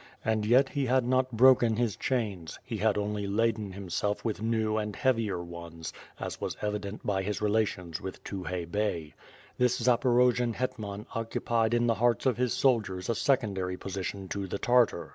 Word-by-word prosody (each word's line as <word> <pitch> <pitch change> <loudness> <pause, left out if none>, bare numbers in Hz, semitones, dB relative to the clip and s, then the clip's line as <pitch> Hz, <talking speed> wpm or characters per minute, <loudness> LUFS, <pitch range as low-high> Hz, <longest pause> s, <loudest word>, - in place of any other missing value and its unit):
And 110 -1 +1
yet 130 +4 +5
he 140 -2 -1
had 130 0 +3
not 130 +1 +2
broken 120 -1 +5
his 115 -3 0
chains; 105 -10 -2
he 115 -3 -4
had 105 0 +2
(mly 105 0 -2
laden 110 -1 0
himself 100 +3 -2
with 110 -2 -2
new 110 -1 0
and 105 -1 -2
heavier 115 -8 0
ones, 85 -1 -8 0.3
as - - -5
was - - -3
evident 105 0 -4
by 95 -2 +1
his 105 +2 -2
relations 100 -6 0
with 95 - -7
Tukhay 90 -3 -4
Bey. 85 -4 -2 0.5
This 125 0 +3
Zaporojian 125 -1 +3
hetman 105 -5 -4
occupied 115 0 0
in 120 0 +2
the 115 - +3
hearts 120 -1 +2
of 130 -2 +2
his 125 -1 +1
soldiers 105 -8 +1
a - - +3
secondary 100 -9 0
position 95 0 -5
to 100 -1 -3
the 95 - -3
Tartar. 120 -6 +2
110 Hz, 170 wpm, -29 LUFS, 100-120 Hz, 0.5 s, yet